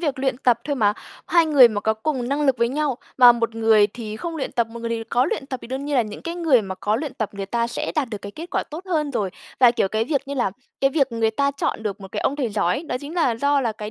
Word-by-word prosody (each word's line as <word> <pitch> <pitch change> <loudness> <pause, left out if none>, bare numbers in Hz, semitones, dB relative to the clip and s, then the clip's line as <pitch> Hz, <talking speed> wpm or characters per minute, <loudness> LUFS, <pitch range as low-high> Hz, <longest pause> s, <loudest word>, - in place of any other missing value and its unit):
việc 265 -2 -3
luyện 265 -2 0
tập 245 -3 +3
thôi 285 -1 -2
mà. 205 -3 +3 0.3
Hai 335 -2 +4
người 275 -6 +7
mà 205 -2 -3
có 220 +1 +1
cùng 245 +1 -2
năng 290 +2 0
lực 260 -3 +2
với 235 0 +2
nhau, 285 -2 -1 0.2
mà 245 -1 +9
một 230 -1 -2
người 220 -2 +4
thì 215 0 -7
không 335 +6 -5
luyện 285 - -4
tập, 235 -2 +1
một 235 +1 -10
người 230 - -3
thì 225 -1 -2
có 245 +3 +1
luyện 270 - -3
tập, 260 -2 -4
thì - - -10
đương 265 +2 -4
nhiên 290 - -2
là 245 - +4
những 210 -1 -8
cái 335 +1 -4
người 310 -10 +3
mà 190 -1 -5
có 210 +3 -1
luyện 285 -1 -4
tập 220 -4 -2
người 200 -1 -5
ta 235 +3 0
sẽ 235 - -3
đạt 295 -5 0
được 210 -3 -5
cái 200 0 -7
kết 335 +2 -9
quả - - 0
tốt 330 +5 -7
hơn 310 -5 0
rồi. 205 -7 -1 0.3
Và, 245 -2 +8
kiểu, 200 -5 0
cái 220 +2 0
việc 275 0 -2
như 280 - -3
là 245 -7 0 0.3
cái 270 0 +3
việc 275 -4 +1
người 225 -1 +1
ta 280 +5 +1
chọn 280 -5 -2
được 205 -2 -4
một 195 0 -11
cái - - -2
ông 280 - 0
thầy 265 -5 -1
giỏi 190 -4 +1
ấy, 295 - -5
đó 250 - -3
chính 290 +3 -8
là 290 -10 +2
do 280 +3 +2
là 230 -4 -1
cái 210 0 -7
245 Hz, 315 wpm, -22 LUFS, 220-280 Hz, 0.3 s, mà